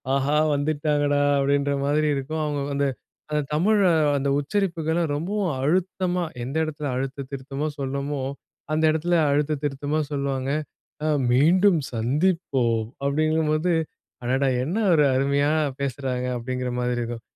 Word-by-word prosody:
"ஆஹா! 140 Hz, +2 st, +1 dB, 0.2 s
வந்துட்டாங்கடா" 145 Hz, 0 st, +1 dB, 0.2 s
அப்படீன்ற 140 Hz, +1 st, +1 dB
மாதிரி 150 Hz, +2 st, +2 dB
இருக்கும். 155 Hz, +4 st, -3 dB
அவங்க 145 Hz, -1 st, -2 dB
அந்த 140 Hz, 0 st, +1 dB, 0.4 s
அந்த 150 Hz, 0 st, +1 dB
தமிழ் 205 Hz, +8 st, +3 dB, 0.4 s
அந்த 140 Hz, 0 st, -1 dB
உச்சரிப்புகளும் 165 Hz, 0 st, 0 dB
ரொம்பவும் 190 Hz, +4 st, -1 dB
அழுத்தமா 180 Hz, +3 st, 0 dB, 0.2 s
எந்த 130 Hz, +4 st, -5 dB
எடத்தில 150 Hz, -1 st, -4 dB
அழுத்தம் 135 Hz, +1 st, -4 dB
திருத்தமா 140 Hz, +2 st, -4 dB
சொல்லணுமோ, 140 Hz, +1 st, -2 dB, 0.5 s
அந்த 155 Hz, +1 st, +1 dB
எடத்தில 165 Hz, +3 st, 0 dB, 0.2 s
அழுத்தம் 150 Hz, 0 st, 0 dB
திருத்தமா 145 Hz, +2 st, -1 dB
சொல்லுவாங்க. 140 Hz, -1 st, -1 dB, 0.5 s
"அ -, -, +1 dB, 0.2 s
மீண்டும் 175 Hz, +8 st, +5 dB, 0.2 s
சந்திப்போம்." 125 Hz, -3 st, +1 dB, 0.2 s
அப்படீங்கும் 155 Hz, +2 st, +1 dB
போது, 160 Hz, +3 st, +1 dB, 0.5 s
"அடடா! 135 Hz, +2 st, +1 dB, 0.2 s
என்ன 165 Hz, +9 st, -2 dB, 0.2 s
ஒரு 150 Hz, -2 st, +5 dB
அருமையா 140 Hz, +2 st, +2 dB, 0.3 s
பேசுறாங்க!" 130 Hz, -2 st, -2 dB
அப்பட்டீங்கிற 125 Hz, +1 st, -3 dB
மாதிரி 125 Hz, 0 st, 0 dB
இருக்கும். 120 Hz, -1 st, -4 dB
145 Hz, 125 wpm, -24 LUFS, 135-155 Hz, 0.5 s, மீண்டும்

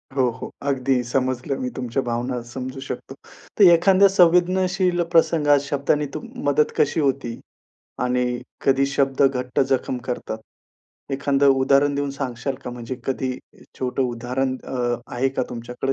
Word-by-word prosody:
हो, 130 Hz, -2 st, +3 dB
हो, -, -, -6 dB, 0.2 s
अगदी 130 Hz, -2 st, +1 dB
समजलं. 130 Hz, +2 st, -1 dB
मी 125 Hz, -, -2 dB
तुमच्या 125 Hz, +1 st, -1 dB
भावना 120 Hz, +1 st, -2 dB
समजू 130 Hz, +1 st, -5 dB
शकतो. 130 Hz, -, -6 dB, 0.5 s
तर -, -, +8 dB
एखांद्या 190 Hz, +3 st, +5 dB
संवेदनशील 180 Hz, 0 st, +3 dB
प्रसंगात 155 Hz, -4 st, +4 dB
शब्दाने 145 Hz, +1 st, 0 dB
तुम 155 Hz, -, -6 dB, 0.2 s
मदत 150 Hz, +1 st, +2 dB
कशी 145 Hz, +2 st, +2 dB
होती 135 Hz, -5 st, -1 dB, 0.6 s
आणि 125 Hz, -1 st, 0 dB, 0.2 s
कधी 135 Hz, 0 st, +3 dB
शब्द 140 Hz, 0 st, +1 dB
घट्ट 125 Hz, -2 st, +1 dB
जखम 130 Hz, -1 st, 0 dB
करतात. 120 Hz, -3 st, -4 dB, 0.7 s
एखांद 140 Hz, +1 st, 0 dB
उदाहरण 140 Hz, +1 st, +4 dB
देऊन 140 Hz, 0 st, -1 dB
सांगाल 135 Hz, -1 st, -4 dB
का 125 Hz, -, -4 dB
म्हणजे 120 Hz, +1 st, -6 dB
कधी 130 Hz, -1 st, -1 dB, 0.5 s
छोटं 130 Hz, +1 st, -1 dB
उदाहरण 125 Hz, +2 st, -2 dB
अ, 120 Hz, -2 st, -1 dB, 0.2 s
आहे 130 Hz, +2 st, +1 dB
का 135 Hz, -, -2 dB
तुमच्याकडे? 125 Hz, +3 st, -3 dB
135 Hz, 140 wpm, -22 LUFS, 125-140 Hz, 0.7 s, तर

